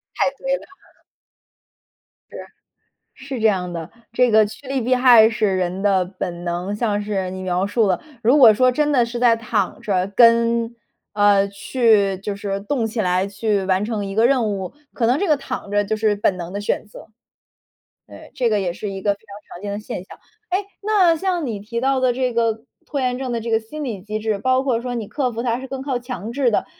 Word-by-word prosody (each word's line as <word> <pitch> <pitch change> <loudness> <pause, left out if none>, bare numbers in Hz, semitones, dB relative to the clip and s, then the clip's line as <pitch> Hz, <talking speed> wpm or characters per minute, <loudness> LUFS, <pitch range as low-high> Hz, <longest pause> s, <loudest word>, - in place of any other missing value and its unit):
太 - - +2
对 - - -1
了。 - - -13 1.6
是， - - -9 1.0
是 - - -5
这 220 - +3
样 185 -4 0
的， 165 -2 -6 0.2
这 245 +1 +3
个 215 -1 +5
趋 220 +7 -12
利 270 0 -1
避 250 +2 +2
害 245 -3 +7
是 215 -4 0
人 185 +1 -2
的 195 -3 +3
本 175 -1 -6
能。 175 +3 -3
像 210 -1 -1
是 195 -3 -2
你 185 0 -6
描 185 +1 0
述 215 +2 +1
了， 185 -2 +1 0.2
如 250 +7 +4
果 240 -6 +9
说 255 +3 +4
真 295 +3 +1
的 250 -4 +4
是 240 +1 -5
在 235 -1 +4
躺 220 -4 -2
着， 185 -3 0
跟 230 0 +4 0.4
呃， 205 -1 +4
去 200 -1 +2
就 200 +1 -5
是 200 -1 -3
动 230 +3 -1
起 225 +1 -3
来 185 -1 +1
去 200 0 -1
完 190 +1 +1
成 215 -2 -3
一 195 0 -5
个 225 +3 +4
任 245 -4 +2
务， 190 -2 -5 0.2
可 235 - 0
能 250 +4 +2
这 400 - 0
个 305 - +4
躺 275 -6 -6
着 205 0 +1
就 215 +2 -1
是 215 -1 +1
本 200 -2 +1
能 175 0 -7
的 200 - -4
选 205 - -2
择。 210 - -13 1.0
对， - - -13
这 245 - +1
个 210 -1 +2
也 180 -3 -1
是 205 +3 -6
一 195 0 -6
个 200 0 +1
非 - - -24
常 205 -1 -14
常 175 - -12
见 205 -1 -4
的 205 - -3
现 210 -4 -6
象。 - - -14 0.3
诶， 365 - +2 0.2
那 395 -5 +3
像 355 -2 -1
你 225 -4 -3
提 230 +4 -5
到 270 +1 +1
的 255 -1 +3
这 255 0 -1
个 225 -1 0 0.2
拖 285 - -3
延 250 -1 0
症 260 -2 -3
的 235 - -2
这 230 +1 -5
个 225 - +3
心 225 +8 -8
理 225 -9 -4
机 215 +2 -4
制， 215 -1 -1
包 255 +4 +2
括 250 -4 0
说 250 0 -4
你 225 -4 -4
克 260 -4 -1
服 230 +1 -4
它 235 -1 0
是 265 - -7
更 265 0 -6
靠 265 -3 -2
强 240 -4 -6
制 260 -1 +1
的。 215 - 0
220 Hz, 240 characters per minute, -21 LUFS, 200-250 Hz, 1.6 s, 果